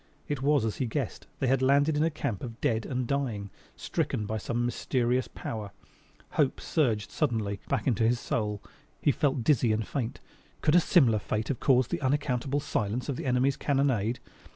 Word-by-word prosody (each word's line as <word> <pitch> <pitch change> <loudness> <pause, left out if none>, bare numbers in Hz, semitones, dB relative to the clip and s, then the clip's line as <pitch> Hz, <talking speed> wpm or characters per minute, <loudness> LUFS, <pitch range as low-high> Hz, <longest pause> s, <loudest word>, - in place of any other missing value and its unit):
It 145 -3 -2
was 140 -3 +3
as 110 - -2
he 130 - -1
guessed: 110 - -3
they - - -1
had 130 +1 +2
landed 140 +3 +4
in 150 - +1
a 165 - +3
camp 145 - -3
of 115 -2 -7
dead 110 -1 0
and 125 -1 -1
dying; 115 -7 -2 0.2
stricken 105 - -2
by 110 +1 -2
some 120 +3 -1
mysterious 125 +1 0
power. 105 -3 -6 0.6
Hope - - +1
suddenly 125 -9 +1
surged 105 -3 -2
back - - 0
into 115 -3 +2
his 120 +1 +2
soul. 105 -3 -2 0.4
He 145 - +3
felt 140 -4 0
dizzy 125 -3 +3
and 110 0 -1
faint. 125 -5 -3 0.4
Could 150 - +3
a 175 - +8
similar 130 - +4
fate 110 +2 -2
have 135 - -1
caused 130 -3 +3
the - - -1
unaccountable 135 0 0
silence 120 -3 -2
of 140 - -1
the 130 - -4
enemy's 130 +2 +2
cannonade? 130 -5 +1
125 Hz, 185 wpm, -29 LUFS, 110-140 Hz, 0.6 s, a